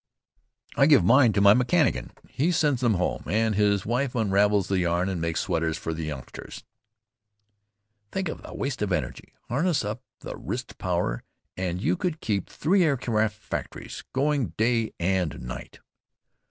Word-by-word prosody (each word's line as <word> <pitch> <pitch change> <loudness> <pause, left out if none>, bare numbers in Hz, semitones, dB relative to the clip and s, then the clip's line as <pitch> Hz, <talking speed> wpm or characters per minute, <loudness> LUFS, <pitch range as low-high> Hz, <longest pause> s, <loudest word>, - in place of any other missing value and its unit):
"I 140 - +5
give 145 -4 +6
mine 130 -1 +6
to 100 - +2
my 100 0 +8
mechanician. 115 - +2 0.2
He 155 +7 0
sends 150 -6 +1
them 120 -4 +3
home, 90 0 -1
and 110 +5 +1
his 100 -1 +2
wife 125 +3 -1
unravels 100 -3 +2
the 95 -1 +1
yarn 90 +1 +1
and 90 -3 -3
makes 85 0 -1
sweaters 80 -1 -1
for 80 - -4
the 80 0 -4
youngsters." 70 -4 -8 1.5
"Think 190 -1 -2
of 155 - -5
the - - -10
waste 135 -4 -3
energy. 90 -6 -3
Harness 150 - +1
up 105 +3 -4 0.2
the - - -6
wrist - - -6
power - - -1 0.3
and 90 -1 -2
you 90 -1 +1
could 170 -3 -2
keep 100 -4 -2
three 185 +5 +2
aircraft 115 -8 +1
factories 105 - -6
going 140 -1 0
day 115 0 +1
and 90 -2 0
night." 60 -1 -8
105 Hz, 155 wpm, -26 LUFS, 90-130 Hz, 1.5 s, my